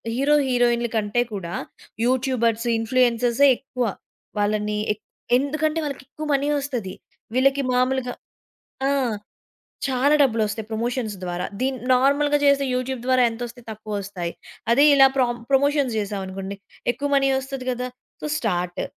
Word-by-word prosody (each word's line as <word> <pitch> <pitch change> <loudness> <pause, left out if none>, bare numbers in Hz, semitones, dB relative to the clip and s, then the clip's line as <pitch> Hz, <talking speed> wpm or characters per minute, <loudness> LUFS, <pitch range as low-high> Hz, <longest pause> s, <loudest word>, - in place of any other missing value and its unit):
Hero 285 +4 +3
హీరోయిన్ల 240 -1 +2
కంటే 215 +3 +1
కూడా 175 -4 -5 0.5
యూట్యూబర్స్, 245 -2 +1
ఇన్‌ఫ్లూయెన్సర్సే 240 +3 +3
ఎక్కువ. 250 -2 -3 0.5
వాళ్ళని 210 0 0
ఎక్ 210 - -21 0.3
ఎందుకంటే 305 +4 0
వాళ్ళకెక్కువ 285 +1 -6
మనీ 280 +1 +1
వస్తది. 245 -9 -4 0.4
వీళ్ళకి 275 +2 +3
మామూలుగా 250 0 +1 0.8
ఆ! - - +2 1.0
చాలా 270 +2 +2
డబ్బులొస్తాయి 220 -4 +1
ప్రమోషన్స్ 230 0 -2
ద్వారా. 180 0 -3
దీన్ని 260 -1 -1
నార్మల్‌గా 285 +3 +4
చేసే 280 -1 +4
యూట్యూబ్ 255 0 -2
ద్వారా 255 0 +3
ఎంత 225 +1 -8
వస్తాయ్ 240 0 -12
తక్కువ 215 0 -7
వస్తాయ్. 180 -4 -5 0.4
అదే 280 +5 +6
ఇలా 270 -1 +8
ప్రామ్ 240 -2 +1
ప్రమోషన్స్ 280 -2 +2
జేసాం 205 -1 -2
అనుకోండి. 195 +1 -6 0.4
ఎక్కువ 285 +2 -3
మనీ 275 0 +3
వస్తది 265 -1 -6
గదా! 250 0 -3 0.3
So - - -3
start. 180 -5 -1
250 Hz, 130 wpm, -23 LUFS, 220-270 Hz, 1.0 s, ఇలా